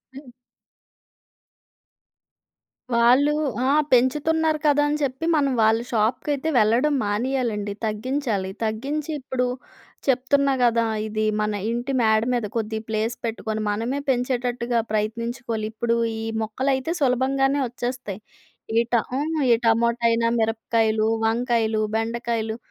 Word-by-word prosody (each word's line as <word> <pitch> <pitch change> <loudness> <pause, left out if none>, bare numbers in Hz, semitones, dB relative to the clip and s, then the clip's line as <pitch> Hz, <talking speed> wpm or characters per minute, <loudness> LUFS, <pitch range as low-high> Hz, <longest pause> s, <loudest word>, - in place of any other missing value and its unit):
హ్మ్. 275 -1 -11 2.6
వాళ్ళు 250 +5 +5 0.3
ఆ! 270 - +3 0.2
పెంచుతున్నారు 305 +5 +2
కదా 290 0 +4
అని 300 - 0
చెప్పి 270 +2 -2
మనం 280 -2 +2
వాళ్ళ 220 +1 +4
షాప్‌కి 225 +5 0
అయితే 285 +3 -2
వెళ్ళడం 235 +7 +3
మానేయాలండి. 210 -1 -1
తగ్గించాలి. 220 -3 -2
తగ్గించి 275 +8 -2
ఇప్పుడు 255 -1 -2 0.6
చెప్తున్నా 275 +2 +2
గదా! 230 -1 +3 0.2
ఇది 215 0 -1 0.2
మన 210 0 0 0.2
ఇంటి 240 +3 -2
మేడ 220 -1 +3
మీద 235 -3 0
కొద్దిగ 220 -1 -2
ప్లేస్ 220 +2 -1
పెట్టుకొని 220 -1 -3
మనమే 230 +7 -1
పెంచేటట్టుగా 245 -1 0
ప్రయత్నించుకోలి. 230 +1 -2
ఇప్పుడు 230 +1 0 0.2
ఈ - - -4 0.2
మొక్కలైతే 265 +6 -1
సులభంగానే 270 +2 +2
ఒచ్చేస్తాయి. 245 -4 -5 0.6
ఈ - - +5
ట - - +6 0.2
ఆ! - - 0 0.3
ఈ - - +8
టమోటా 235 +1 +2
అయినా, 230 0 +2
మిరపకాయలు, 220 -1 +1 0.2
వంకాయలు, 225 -1 +1
బెండకాయలు 225 -1 -2
235 Hz, 115 wpm, -23 LUFS, 220-265 Hz, 2.6 s, ఈ